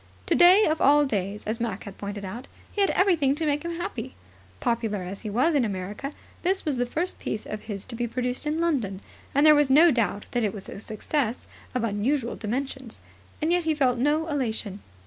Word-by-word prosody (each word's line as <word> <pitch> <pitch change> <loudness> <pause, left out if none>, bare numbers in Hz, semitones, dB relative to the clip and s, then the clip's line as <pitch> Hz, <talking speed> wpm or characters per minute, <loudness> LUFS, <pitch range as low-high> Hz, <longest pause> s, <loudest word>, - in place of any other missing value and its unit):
Today 370 +5 +6
of 315 0 0
all 290 +1 +6
days, 205 -4 -2
as 220 +2 -2
Mac 225 -4 -3
had 200 -2 -10
pointed 200 0 -5
out, 230 +8 -7 0.2
he 410 - -1
had 395 - +4
everything 330 -8 +3
to 320 +1 -2
make 295 +1 0
him 340 0 -3
happy. 260 - -5 0.4
Popular 225 - -1
as 190 +2 -6
he 215 - -5
was 255 +11 +2
in 285 -4 +3
America, 205 +6 -4 0.3
this 375 +2 0
was 290 -4 0
the 245 0 0
first 335 +8 -1
piece 215 - -4
of 215 0 -6
his 200 -3 -6
to 255 - -10
be 240 +1 -1
produced 250 +4 -3
in 305 +2 0
London, 245 - 0 0.3
and 285 +2 +5
there 305 - +9
was 295 -2 +3
no 315 +5 +7
doubt 225 -5 0
that 245 - 0
it 210 -2 0
was 195 - -8
a - - -8
success 230 +3 -2 0.3
of 250 - 0
unusual 230 +4 0
dimensions. 255 +1 -4 0.4
And 320 - +2
yet 350 -1 +2
he 315 -1 +2
felt 255 -4 +2
no 295 +5 +2
elation. 225 - -2
250 Hz, 210 wpm, -26 LUFS, 215-300 Hz, 0.4 s, there